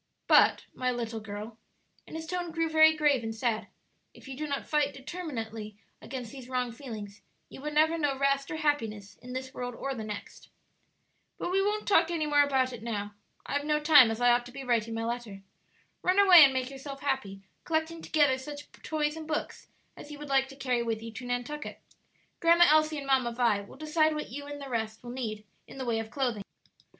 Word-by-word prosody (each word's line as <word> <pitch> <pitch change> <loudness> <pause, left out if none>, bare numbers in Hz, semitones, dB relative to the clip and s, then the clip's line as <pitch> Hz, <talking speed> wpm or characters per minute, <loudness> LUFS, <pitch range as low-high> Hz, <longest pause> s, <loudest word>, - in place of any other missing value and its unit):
But, - - +5
my 255 0 -1
little 235 -2 -3
girl," 215 +1 -8 0.5
and - - -9
his 320 0 -5
tone 355 0 -3
grew 330 0 -1
very 315 0 +6
grave 295 -5 +2
and 225 0 -4
sad, 225 -2 -1 0.5
"if - - -14
you 270 - -6
do 305 +3 -4
not 280 -1 -3
fight 295 -2 +1
determinately 230 - -6 0.2
against 250 -3 -7
these 260 -2 -10
wrong 250 -1 -1
feelings 220 -5 -8 0.3
you - - -11
will 300 - -3
never 315 +2 +3
know 285 -3 0
rest 275 0 +1
or - - -3
happiness 225 -10 -2
in 250 0 -10
this 260 +1 -5
world 245 -2 -5
or 275 +2 -3
the 225 -4 -6
next. 210 -1 -8 0.9
"But - - -3
we 385 +1 +3
won't 420 +2 -1
talk 335 -5 +4
any 330 -3 -1
more 295 -1 +4
about 265 -3 +2
it 235 - -8
now; 210 -3 -4 0.3
I - - -5
have 285 0 0
no 300 0 +1
time, 295 -5 +7
as 225 +1 -3
I 245 0 +5
ought 240 0 +3
to - - -11
be 275 +1 -7
writing 230 -3 0
my 225 0 -2
letter. 230 -5 -5 0.6
Run 365 +1 +2
away 370 -5 +9
and 270 - +3
make 260 0 -2
yourself 275 0 -8
happy, 210 -9 -2 0.2
collecting 320 +1 -1
together 290 -5 +2
such 290 +2 -9
toys 300 -1 -1
and 320 -1 -8
books 305 -1 -4 0.3
as - - -11
you 295 - -8
would 295 0 -9
like 270 -1 +3
to 270 - -12
carry 255 -3 0
with 225 -1 -2
you 230 - -7
to 245 +3 -8
Nantucket. 245 +5 -4 0.6
Grandma 340 +1 +6
Elsie 310 0 +3
and 280 - -5
Mamma 260 -3 +2
Vi 230 -4 +2
will 200 - -13
decide 310 +1 +1
what 300 - -5
you 285 +3 -7
and 290 0 -7
the 280 - -7
rest 220 -3 -3
will 240 - -7
need 220 -4 -5 0.2
in - - -12
the 260 - -4
way 230 -2 0
of 225 0 -5
clothing." 240 -4 -1
265 Hz, 215 wpm, -29 LUFS, 230-300 Hz, 0.9 s, away